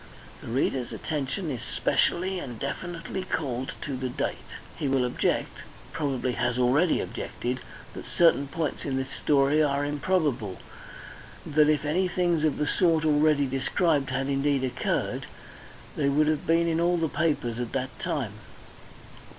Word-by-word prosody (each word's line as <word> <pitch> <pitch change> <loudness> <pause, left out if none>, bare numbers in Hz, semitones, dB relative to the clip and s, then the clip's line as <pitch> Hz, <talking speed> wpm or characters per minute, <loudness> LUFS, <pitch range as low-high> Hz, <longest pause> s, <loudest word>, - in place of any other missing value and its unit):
The - - -10
reader's 125 +1 0
attention 150 +3 -3
is 125 - -4
specially 185 +2 +1
and 125 -8 -6
definitely 170 - -4
called 130 -8 -3
to 140 - -3
the 130 0 -3
date. - - -3 0.3
He 145 - -2
will 135 -2 +2
object, 125 - -1 0.3
probably 135 -5 -1
has 120 0 -1
already 135 +7 +3
objected, 125 +1 -4 0.3
that - - -8
certain 165 -5 +4
points 155 +2 -3
in 135 -2 -1
this 135 +1 -3
story 145 +1 +3
are 145 -1 +1
improbable, 145 - 0 0.9
that 150 0 +4
if 150 -1 +2
any 180 +5 +2
things 175 -3 +1
of 155 -2 +2
the 150 - 0
sort 165 -2 +2
already 150 -1 +4
described 140 +2 +1
had 135 +1 -1
indeed 140 0 +1
occurred, 130 - -1 0.7
they 140 -2 +1
would 150 +2 +3
have 155 -1 0
been 165 +1 +3
in 165 0 +1
all 175 +1 +3
the 165 -1 +1
papers 145 -8 0
at 120 -2 -3
that 130 0 -3
time. 120 -9 -2
145 Hz, 150 wpm, -27 LUFS, 130-160 Hz, 0.9 s, certain